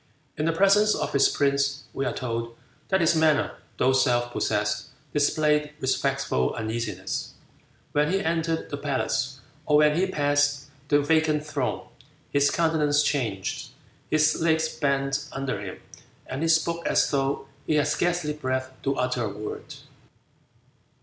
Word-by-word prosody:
In 155 - -2
the 165 - +3
presence 200 +4 +4
of - - -3
his 140 -1 +5
prince 140 0 +1
we 135 - -2
are - - 0
told 115 -2 -4 0.3
that 190 -1 +2
his 165 0 +3
manner, 160 -2 +3 0.3
though 130 +1 +3
self 120 -2 +2
possessed, 100 -1 -1 0.3
displayed 150 0 +2
respectful 65 - 0
uneasiness. 110 -4 -3 0.6
When 150 +1 +2
he 195 - +2
entered 165 -2 -1
the 145 - -2
palace, 135 -2 -2 0.3
or 150 - +5
when 150 0 +5
he 185 +3 +2
passed 145 -3 +1 0.2
the 145 0 +4
vacant 155 0 +2
throne, 140 -4 -3 0.4
his 140 0 +3
countenance 150 -3 +2
changed, 110 -11 -2 0.4
his 155 +1 +2
legs 160 -1 +2
bent 140 0 -1
under 135 -6 -3
him, 95 -2 -7 0.5
and 130 +3 -5
he 165 - +1
spoke 170 +1 +2
as - - +2
though 135 -1 -1 0.2
he 155 - +2
had 150 - +3
scarcely 175 -3 0
breath 130 -3 -2
to 135 0 0
utter 125 -2 0
a - - -2
word. 105 +1 -7
145 Hz, 145 wpm, -26 LUFS, 130-155 Hz, 0.6 s, his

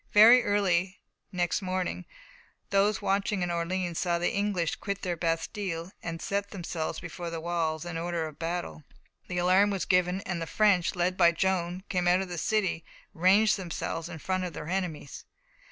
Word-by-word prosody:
Very 230 +4 +9
early 190 -2 +1 0.3
next 175 +1 0
morning, 185 -1 -2 0.7
those 200 +1 +2
watching 195 -1 0
in 175 - -1
Orleans 170 0 -2
saw 175 -2 +1
the 175 - 0
English 200 -5 0
quit 200 -1 -4
their 180 -2 -1
bastiles 165 +1 -2
and 165 -1 -5
set 200 +3 -2
themselves 170 -4 -4
before 170 +1 -6
the 165 0 -4
walls 165 -1 -2
in 175 -1 -4
order 170 -1 -2
of 155 -2 -9
battle. 170 -1 -4 0.4
The 180 - -4
alarm 185 +3 +4
was 195 -2 -2
given, 180 +1 +2
and 180 -4 -4
the 165 - -3
French, 200 -3 +2
led 180 +1 0
by 170 -2 +5
Joan, 180 0 -1
came 180 -2 0
out 180 +2 +4
of 190 - -5
the 175 -2 -4
city 195 -6 0 0.3
and 165 - -15
ranged 210 +4 +5
themselves 170 -2 -4
in 175 - -7
front 185 +4 -2
of 180 -2 -4
their 150 +2 -7
enemies. 175 -6 -3
180 Hz, 180 wpm, -28 LUFS, 170-195 Hz, 0.7 s, Very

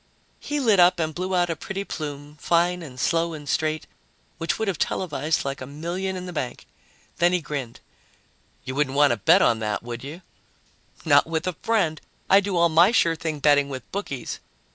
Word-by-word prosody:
He 295 0 -3
lit 220 -8 +3
up 180 0 +5
and 160 -1 -1
blew 185 +2 -2
out 175 -1 +2
a - - -2
pretty 195 +4 -5
plume, 145 -4 -6
fine 175 +3 +1
and 130 -6 -10
slow 165 +2 +1
and 150 -2 -9
straight, 155 +2 -1 0.5
which 165 0 -1
would 220 - -2
have 190 -5 -2
televised 155 -4 -1
like 140 -1 -4
a 130 - -6
million 175 +6 -4
in 180 0 -6
the 180 - -7
bank. 130 -6 -4 0.5
Then 175 +1 +3
he 180 - +2
grinned. 140 -7 -6 0.8
"You 130 - -5
wouldn't 140 -1 0
want 145 -2 +5
to 120 - 0
bet 100 - +5
on 115 - +3
that, 105 0 -2
would 120 0 -6
you?" 155 +6 -8 0.8
"Not - - +5
with 160 -1 -2
a 185 - -1
friend. 195 -9 0 0.3
I 195 - +8
do 200 -2 -2
all 170 0 +5
my 170 +5 +5
sure 165 -8 +3
thing 160 -1 -4
betting 145 -1 +4
with 130 -3 -8
bookies." 140 - -5
160 Hz, 200 wpm, -24 LUFS, 145-180 Hz, 0.8 s, I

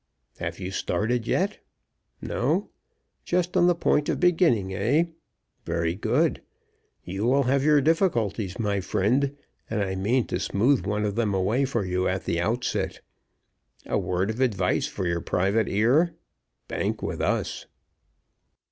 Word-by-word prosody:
Have - - -4
you 95 0 -4
started 110 +6 -1
yet? 200 +3 0 0.6
No? - - -1 0.5
Just 180 0 0
on 175 - +5
the 175 - +4
point 150 -3 +1
of - - 0
beginning, 160 - +3
eh? 120 - +2 0.6
Very 85 0 -1
good. 95 - +1 0.6
You 95 +4 -3
will 135 +3 +3
have 135 +2 +2
your 150 -1 +5
difficulties, 120 - +1
my 105 -3 0
friend, 135 +10 +1 0.3
and 110 - -1
I 95 -1 -2
mean 110 +7 +1
to 90 - -3
smooth 105 +2 +1
one 105 +1 0
of 105 - -1
them 105 -3 0
away 105 +9 +1
for 120 -6 -1
you 90 0 0
at 90 -3 -2
the 85 - 0
outset. 115 +7 -1 0.8
A - - 0
word 90 +3 -1
of 110 - -7
advice 100 -8 +1
for 95 - -4
your 85 -1 0
private 100 +7 +1
ear 135 - +3 0.5
Bank - - -2
with - - -3
us." - - -1
110 Hz, 145 wpm, -26 LUFS, 95-140 Hz, 0.8 s, on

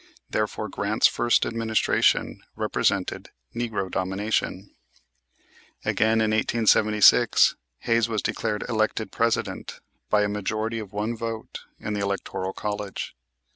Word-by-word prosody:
Therefore 110 0 -1
Grant's 100 +2 0
first 120 0 +3
administration 115 -1 +1
represented 100 -2 -1 0.3
"Negro 115 -6 -2
Domination." 95 0 -2 1.1
Again, 110 0 +2
in 110 -1 +2
1876, 110 -1 +4 0.3
Hayes 115 -1 +2
was 110 -3 -1
declared 105 -1 -2
elected 110 -1 -1
President 115 0 -1 0.3
by 105 -1 +3
a - - +1
majority 110 +2 -2
of 105 -3 -8
one 105 +3 -2
vote 115 -1 -5 0.2
in 105 - -4
the 105 - -2
electoral 100 -1 -2
college. 105 -5 -5
110 Hz, 110 wpm, -25 LUFS, 105-115 Hz, 1.1 s, 1876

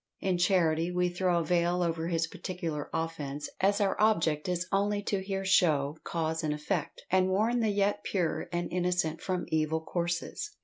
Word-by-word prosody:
In 185 -2 0
charity, 170 -3 +3
we 180 0 +1
throw 180 0 +1
a 170 - +1
veil 175 +1 +1
over 165 -1 -1
his 165 -1 +1
particular 165 -3 -5
offence, 150 -3 -3
as 200 +2 +3
our 200 -2 +2
object 165 -7 +2
is 180 0 -1
only 205 +1 +1
to 200 -1 -1
here 195 0 -3
show 155 -6 +3
cause 160 -1 -2
and 155 - 0
effect, 155 +4 -3
and 185 0 +4
warn 220 +6 +2
the 225 -2 +2
yet 205 0 +1
pure 175 -5 -1
and 175 0 -2
innocent 180 -3 0
from 185 -2 -2
evil 160 0 +1
courses. 175 - -3
175 Hz, 175 wpm, -30 LUFS, 160-190 Hz, -, and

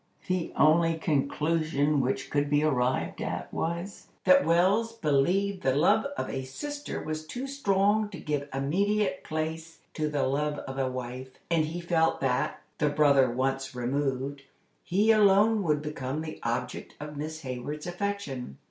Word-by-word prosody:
The 185 -3 -1
only 165 +2 +4
conclusion 155 -1 +1
which 130 +1 -2
could 145 0 +1
be 145 +1 +3
arrived 130 -4 0
at - - -4
was, 170 +4 -4 0.2
that 280 0 +6
Wells 195 +7 +3
believed 185 +3 +1
the 130 0 +2
love 145 - +4
of - - -2
a 135 -1 -3
sister 290 - -5
was 155 0 -4
too 245 +12 -5
strong 210 -6 +1
to 190 -5 -8
give 145 -2 -3
immediate 190 +8 0
place 160 +1 -4 0.2
to 155 -1 -1
the 145 -2 0
love 145 +3 0
of 135 -1 -6
a 130 -1 +1
wife, 130 +1 -6 0.2
and 165 -2 +3
he 165 +3 -5
felt 170 -2 +2
that, 130 -2 0 0.2
the 150 - +3
brother 145 -3 +4
once 135 +2 -1
removed, 135 +2 -2 0.4
he 205 +5 +3
alone 210 +1 +5
would 150 -5 +1
become 150 -1 -3
the 155 -1 -7
object - - -3
of 150 0 -7
Miss 155 +2 -5
Hayward's 135 +3 -5
affection. 175 - -4
155 Hz, 155 wpm, -28 LUFS, 135-185 Hz, 0.4 s, that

